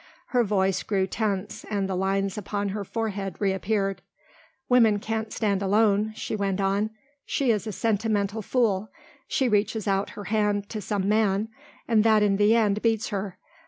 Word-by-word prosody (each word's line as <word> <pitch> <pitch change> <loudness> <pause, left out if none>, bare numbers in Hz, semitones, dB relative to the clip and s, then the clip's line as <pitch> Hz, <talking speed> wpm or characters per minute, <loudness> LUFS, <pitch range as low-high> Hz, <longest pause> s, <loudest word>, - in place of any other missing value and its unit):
Her 245 -2 +3
voice 195 -3 +1
grew 195 -3 0
tense 200 -1 -3
and 200 -2 -1
the 190 - -2
lines 195 +1 0
upon 205 0 -3
her 200 +1 -3
forehead 200 -4 -3
reappeared. 195 0 0 0.7
"Woman 230 -4 +5
can't 220 +1 -3
stand 200 -3 0
alone," 210 +1 +2
she 220 - -4
went 200 -2 -1
on, 200 +2 +1 0.3
"she 265 -4 +1
is 215 0 -1
a - - -2
sentimental 215 0 0
fool. 215 -3 0 0.4
She 265 - +1
reaches 215 0 0
out 195 0 +1
her 205 - -5
hand 205 -1 0
to 215 - -4
some 200 -1 -1
man 210 0 +2 0.4
and 220 -2 +4
that 220 -2 +4
in 200 -1 +2
the 210 +2 +4
end 210 -2 +2
beats 225 -2 +1
her. 195 -2 -4
205 Hz, 165 wpm, -26 LUFS, 195-220 Hz, 0.7 s, Woman